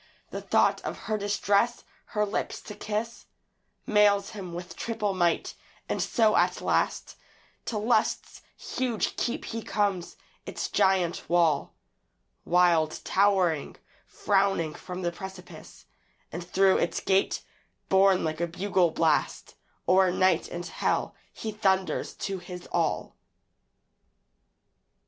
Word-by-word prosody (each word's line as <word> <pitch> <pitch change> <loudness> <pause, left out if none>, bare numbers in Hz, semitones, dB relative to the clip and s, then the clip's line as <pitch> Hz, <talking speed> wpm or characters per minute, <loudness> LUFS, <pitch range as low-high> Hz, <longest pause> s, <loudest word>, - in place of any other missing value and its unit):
The - - -5
thought - - +2
of - - -5
her 215 - 0
distress, 205 +2 +1 0.3
her 210 - +3
lips 205 - -3
to 210 - -9
kiss, 215 +3 -4 0.6
Mails 205 -1 +3
him 190 -5 -7
with 175 0 -7
triple 225 -3 -2
might; 175 -3 +1 0.3
and - - -1
so 220 -3 +2
at - - +2
last - - -1 0.5
To 225 - -2
Lust's 220 +4 0 0.2
huge 245 -4 -2
keep 240 - -2
he 230 0 -4
comes; 200 -5 -1 0.3
its - - -4
giant 185 -3 +1
wall, 165 -4 +2 0.7
Wild 170 -3 +3
towering, 190 -6 +2 0.3
frowning 195 -6 +1
from 180 +2 -7
the 175 - 0
precipice; 190 0 -11 0.5
And 175 +2 -5
through 190 +2 +3
its 170 - 0
gate, 190 0 +1 0.4
borne 190 -1 +4
like 155 0 -2
a 170 - +1
bugle 180 0 +1
blast, 160 -1 0 0.3
O'er 185 0 +5
night 185 -1 +2
and 175 0 -6
hell - - -1 0.2
he 220 - -5
thunders 190 -3 0
to 195 -2 -4
his 180 0 -9
all. - - -1
190 Hz, 120 wpm, -27 LUFS, 175-205 Hz, 0.7 s, O'er